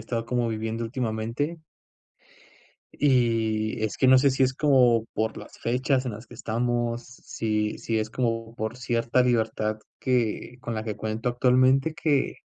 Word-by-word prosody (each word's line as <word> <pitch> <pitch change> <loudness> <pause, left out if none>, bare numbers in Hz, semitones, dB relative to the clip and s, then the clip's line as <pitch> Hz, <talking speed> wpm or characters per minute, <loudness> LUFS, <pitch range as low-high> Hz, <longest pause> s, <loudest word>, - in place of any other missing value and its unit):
estado 115 +1 -3
como 120 -1 0
viviendo 110 +1 -3
últimamente. 115 +6 -2 1.3
Y, 115 -5 +1
es 110 - -2
que 130 - +4
no 130 0 +8
sé 140 +1 +4
si 135 +1 +1
es 130 0 +2
como 125 -6 +4
por 110 +1 -1
las - - -11
fechas 130 +2 0
en 120 - -2
las 110 +3 -9
que 120 - -13
estamos, 120 +1 -1
si 110 -4 -3
si 115 -1 -1
es 110 0 -2
como 115 -2 -2
por 110 +1 -4
cierta 120 0 +1
libertad 110 -3 0 0.2
que 125 -1 -1
con 120 - -4
la 110 - -3
que 105 -2 -4
cuento 110 +2 -3
actualmente, 130 +4 +3
que 145 -4 0
120 Hz, 160 wpm, -26 LUFS, 110-130 Hz, 1.3 s, no